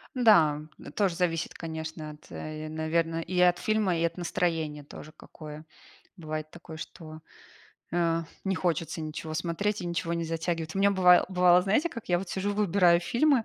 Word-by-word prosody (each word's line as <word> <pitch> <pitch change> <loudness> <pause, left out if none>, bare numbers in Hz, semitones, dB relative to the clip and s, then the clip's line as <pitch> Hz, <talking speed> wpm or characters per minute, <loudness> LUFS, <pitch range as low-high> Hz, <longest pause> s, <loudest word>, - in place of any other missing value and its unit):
Да, 170 - +5 0.3
тоже 195 -5 +1
зависит, 170 -2 -1
конечно, 160 -1 -6
от, 150 0 -16
э, 155 0 -6
наверно, 165 +1 -1
и 180 +2 -2
от 180 0 +5
фильма, 205 -2 +1
и 165 - 0
от 170 - 0
настроения 165 -4 -1
тоже 150 +2 -11
какое. 155 0 -11 0.5
Бывает 155 -2 -5
такое, 165 -2 -10
что, 155 0 -9 0.7
э, 165 -1 +1 0.2
не 195 -1 0
хочется 165 -1 -1
ничего 155 0 -5
смотреть, 170 +6 -1
и 180 - -4
ничего 170 0 -2
не 170 0 -1
затягивает. 165 0 -3
У - - -2
меня 200 +1 +4
быва 180 -2 +6
бывало, 180 -1 +5
знаете 215 - +2
как, 230 - -8
я 175 - +4
вот 190 0 -6
сижу 195 +3 -2
выбираю 185 -4 +4
фильмы, 240 - +2
170 Hz, 170 wpm, -28 LUFS, 160-185 Hz, 0.7 s, быва